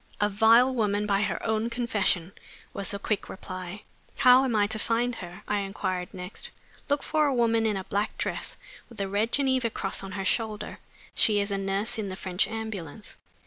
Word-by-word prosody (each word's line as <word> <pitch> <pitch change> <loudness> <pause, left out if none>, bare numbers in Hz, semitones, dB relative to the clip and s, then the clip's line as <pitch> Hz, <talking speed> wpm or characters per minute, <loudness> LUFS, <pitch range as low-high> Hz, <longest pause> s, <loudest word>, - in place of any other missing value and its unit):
"A 210 - +3
vile 230 +5 +6
woman, 210 -3 +1
by 200 -1 +2
her 205 - -1
own 220 +1 +1
confession," 210 -7 0 0.4
was 200 - -4
the 200 - -3
quick 205 +1 -2
reply. 185 +1 -7 0.3
"How 255 0 +7
am 250 -4 0
I 205 -1 +4
to 220 +1 -2
find 235 +3 +1
her?" 175 -3 -9
I 210 - +1
inquired 190 -2 -3
next. 190 - -5 0.4
"Look 285 0 +1
for 305 -1 +2
a 275 - +1
woman 230 -2 +3
in 210 -2 0
a 190 - -4
black 205 +3 -2
dress, - - -3 0.3
with 235 - -14
the 195 - -1
Red 205 +4 0
Geneva 260 -4 +2
Cross 195 -3 -2
on 195 0 -7
her 195 -1 -3
shoulder; 220 0 -1 0.3
she 210 -2 +3
is 200 0 -1
a 200 - 0
nurse 200 +4 -1
in 205 -2 -2
the 185 - -5
French 185 -1 0
ambulance." 215 -5 -6
210 Hz, 195 wpm, -27 LUFS, 195-230 Hz, 0.4 s, How